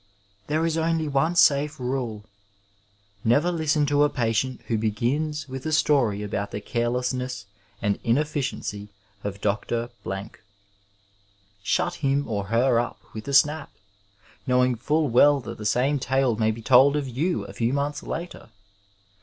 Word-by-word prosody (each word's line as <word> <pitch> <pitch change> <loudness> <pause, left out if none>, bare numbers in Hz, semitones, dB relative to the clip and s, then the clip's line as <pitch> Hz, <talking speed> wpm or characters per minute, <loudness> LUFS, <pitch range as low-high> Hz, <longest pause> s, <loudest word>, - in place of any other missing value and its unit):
There 155 +2 +1
is 165 0 0
only 160 -1 0
cme 160 +5 +1
safe 145 -1 +4
nde 125 -4 -3 0.5
— 100 0 -38
^never 170 +8 +2
listen 155 -2 +1
to 145 0 +2
a 150 - +5
patient 125 0 -1
who 115 - -1
begins 140 +9 -1
with 130 0 -7
a - - -1
story 125 -9 +2
about 100 0 -3
the 105 - -5
carelessness 125 +1 -2 0.4
and 100 -1 0
inefficiency 125 -5 -1 0.3
of 100 0 -5
Dr. 115 +3 -1
Blank. 95 +3 -6 1.2
Shut 175 +11 0
him 140 0 +1
or 100 -3 -2
her 115 +3 +2
up 120 - -3
with 110 +2 -8
a 140 - -3
snap, 150 +1 +3 0.8
knowing 125 0 +3
full 150 +6 0
well 140 +4 +5
that - - -8
the 105 - -2
same 135 +6 +1
tale 130 -2 +1
may 110 0 +1
be 110 +1 -4
told 135 +4 +6
of 145 -2 -1
you 155 +9 -1
a - - -10
few 115 +1 0
months 145 +1 -1
later. 170 -4 -6
130 Hz, 155 wpm, -25 LUFS, 110-145 Hz, 1.2 s, told